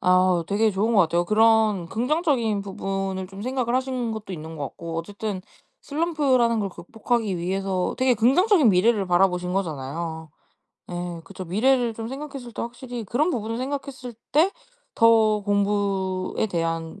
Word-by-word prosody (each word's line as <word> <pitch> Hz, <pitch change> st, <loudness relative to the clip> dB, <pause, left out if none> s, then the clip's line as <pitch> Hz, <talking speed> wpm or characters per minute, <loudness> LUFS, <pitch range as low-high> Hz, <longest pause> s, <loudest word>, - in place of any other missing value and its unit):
아 185 Hz, -2 st, +3 dB
되게 215 Hz, +2 st, +2 dB
좋은 210 Hz, +4 st, 0 dB
것 200 Hz, -, +6 dB
같아요. 170 Hz, +1 st, +1 dB
그런 215 Hz, -3 st, +3 dB
긍정적인 250 Hz, -, 0 dB
부분을 195 Hz, -1 st, -3 dB
좀 195 Hz, +1 st, -9 dB
생각을 250 Hz, -1 st, -1 dB
하신 255 Hz, -3 st, -1 dB
것도 215 Hz, -3 st, -6 dB
있는 160 Hz, -1 st, -7 dB
거 145 Hz, -, -3 dB
같고 165 Hz, -1 st, -6 dB
어쨌든 200 Hz, +2 st, -4 dB, 0.4 s
슬럼프라는 280 Hz, -7 st, +1 dB
걸 200 Hz, -, -1 dB
극복하기 215 Hz, +3 st, -2 dB
위해서 190 Hz, +1 st, -1 dB
되게 255 Hz, -1 st, +3 dB
긍정적인 280 Hz, -, +4 dB
미래를 200 Hz, +1 st, +3 dB
바라보신 180 Hz, 0 st, +2 dB
거잖아요. 160 Hz, -2 st, -4 dB, 0.6 s
예. 175 Hz, -1 st, -4 dB
그쵸. 185 Hz, +1 st, -8 dB
미래를 235 Hz, +6 st, +2 dB
좀 225 Hz, 0 st, -5 dB
생각했을 270 Hz, -3 st, -7 dB
때 -, -, -4 dB
확실히 240 Hz, -1 st, -6 dB
그런 290 Hz, -, +1 dB
부분을 225 Hz, -4 st, -3 dB
생각했을 260 Hz, -2 st, -5 dB, 0.2 s
때 330 Hz, +6 st, +4 dB, 0.4 s
더 220 Hz, -2 st, +5 dB
공부에 200 Hz, -2 st, 0 dB
대한 165 Hz, -1 st, -3 dB
210 Hz, 335 characters per minute, -24 LUFS, 185-245 Hz, 0.6 s, 것